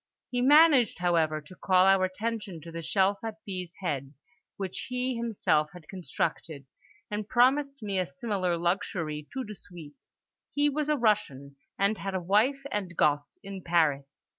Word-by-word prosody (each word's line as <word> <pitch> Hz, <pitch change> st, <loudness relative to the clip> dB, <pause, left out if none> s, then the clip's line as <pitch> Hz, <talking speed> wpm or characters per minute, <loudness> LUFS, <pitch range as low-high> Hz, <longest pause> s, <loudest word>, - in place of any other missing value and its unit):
He 245 Hz, -1 st, 0 dB
managed, 285 Hz, -3 st, +6 dB
however, 165 Hz, -3 st, +1 dB
to 150 Hz, +5 st, -15 dB
call 185 Hz, 0 st, +3 dB
our 195 Hz, -1 st, +5 dB
attention 210 Hz, -1 st, -4 dB
to 165 Hz, +2 st, -10 dB
the 165 Hz, 0 st, -5 dB
shelf 195 Hz, +4 st, +1 dB
at 225 Hz, -1 st, -4 dB
B.'s 185 Hz, -3 st, -6 dB
head 140 Hz, -5 st, -3 dB, 0.4 s
which 190 Hz, -2 st, -5 dB
he 250 Hz, 0 st, -1 dB
himself 220 Hz, -10 st, +1 dB
had 175 Hz, -4 st, -13 dB
constructed, 170 Hz, -5 st, -4 dB, 0.5 s
and 210 Hz, 0 st, -4 dB
promised 275 Hz, +1 st, +2 dB
me 200 Hz, -2 st, -1 dB
a 180 Hz, -, 0 dB
similar 195 Hz, -9 st, -2 dB
luxury 170 Hz, -3 st, -2 dB
toute 260 Hz, -1 st, -4 dB
de 210 Hz, -, -7 dB
suite. 170 Hz, -7 st, -12 dB, 0.5 s
He 290 Hz, 0 st, +3 dB
was 300 Hz, +1 st, -2 dB
a 300 Hz, -, +2 dB
Russian, 140 Hz, -, 0 dB, 0.2 s
and 200 Hz, +2 st, +1 dB
had 195 Hz, -1 st, -4 dB
a -, -, +1 dB
wife 215 Hz, +10 st, +2 dB
and 185 Hz, -5 st, -3 dB
gosse 145 Hz, -1 st, +1 dB
in 195 Hz, -1 st, -7 dB
Paris. 145 Hz, -5 st, 0 dB
190 Hz, 165 wpm, -28 LUFS, 165-230 Hz, 0.5 s, managed